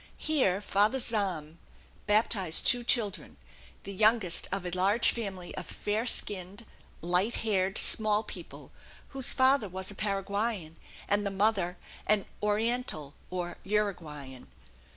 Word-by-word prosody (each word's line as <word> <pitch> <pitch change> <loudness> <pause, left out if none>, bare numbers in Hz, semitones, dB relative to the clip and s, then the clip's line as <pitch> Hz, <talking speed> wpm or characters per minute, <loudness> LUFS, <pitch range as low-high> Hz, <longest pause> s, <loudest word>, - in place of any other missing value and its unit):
Here 255 -12 +1
Father 205 +5 +2
Zahm 185 - -2 0.5
baptized 205 -5 +2
two 245 -1 +3
children, 215 -4 -1 0.5
the 200 - -7
youngest 215 -3 +2
of 195 -1 -3
a 180 - -3
large 195 +6 +2
family 190 -6 -6
of - - -6
fair 215 +4 -2
skinned, 200 0 +1 0.4
light 180 +7 +1
haired 195 -2 +1
small 215 -1 +3
people, - - -9 0.4
whose 270 -1 +1
father 260 -5 +3
was 190 +2 -2
a - - -9
Paraguayan 200 -3 -2 0.3
and 205 0 +1
the 200 - -1
mother 195 -3 +1 0.3
an 210 -2 +2 0.2
"Oriental," 210 - -1 0.2
or 180 -1 -5
Uruguayan. 160 - -3
200 Hz, 125 wpm, -29 LUFS, 185-220 Hz, 0.5 s, two